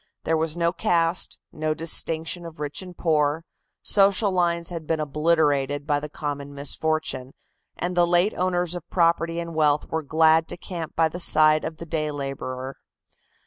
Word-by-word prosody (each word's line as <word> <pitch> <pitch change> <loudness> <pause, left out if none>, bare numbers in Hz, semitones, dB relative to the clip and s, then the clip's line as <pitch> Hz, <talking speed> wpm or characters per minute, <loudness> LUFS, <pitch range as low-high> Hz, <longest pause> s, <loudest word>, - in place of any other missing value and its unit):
There 160 - +1
was 160 +1 -1
no 170 0 +1
caste, 170 -1 0
no 155 0 -2
distinction 165 +1 0
of 165 -2 -10
rich 145 +2 -4
and 180 -2 -11
poor, 155 -1 +1 0.4
social 200 0 +4
lines 170 -2 0
had 165 -3 -6
been 160 -1 0
obliterated 145 -2 +1
by 145 -1 +1
the 150 +1 -7
common 145 -1 -5
misfortune, 140 -2 -1 0.4
and 180 +1 -2
the 175 -1 +4
late 175 +4 +3
owners 180 -1 0
of 175 -2 -7
property 170 -1 +1
and 170 0 -5
wealth 150 -2 +2
were 160 - -1
glad 160 +2 +3
to - - -7
camp 170 -2 -6
by 165 -1 +3
the 170 +3 -7
side 155 -2 +5
of 160 0 -5
the 170 - -8
day 155 -2 -2
laborer. 135 -2 -5
160 Hz, 170 wpm, -24 LUFS, 150-170 Hz, 0.4 s, side